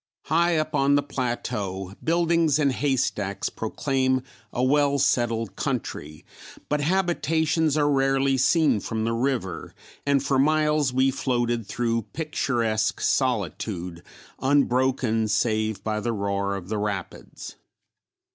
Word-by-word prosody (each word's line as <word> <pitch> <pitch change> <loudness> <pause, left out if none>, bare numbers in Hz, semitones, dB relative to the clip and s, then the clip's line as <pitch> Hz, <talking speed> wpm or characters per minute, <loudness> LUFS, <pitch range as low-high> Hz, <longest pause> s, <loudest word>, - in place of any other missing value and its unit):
High 170 +1 +2
up 155 0 -1
on 140 -1 +3
the 145 - +2
plateau, 105 -8 -3
buildings 165 -2 +2
and 145 -3 +2
haystacks 120 -8 -1
proclaim 130 +3 -1 0.3
a 125 - -1
well 140 +1 +3
settled 115 -6 0
country, 75 +1 -4 0.4
but 150 0 +1
habitations 160 -2 +1
are 145 -1 +3
rarely 135 -1 +2
seen 145 -1 +3
from 110 +2 -3
the 115 +1 0
river 115 -8 -2 0.3
and 140 -1 +2
for 135 -1 +1
miles 150 -1 +2
we 130 +1 +2
floated 120 -4 -1
through 115 0 -1
picturesque 120 -8 -1
solitude 95 - -1 0.4
unbroken 130 -4 +2
save 110 -1 0
by 105 0 -1
the 115 +2 -2
roar 100 -1 -1
of 95 -2 -7
the 105 +1 -2
rapids. 100 -3 -5
130 Hz, 120 wpm, -25 LUFS, 110-145 Hz, 0.4 s, on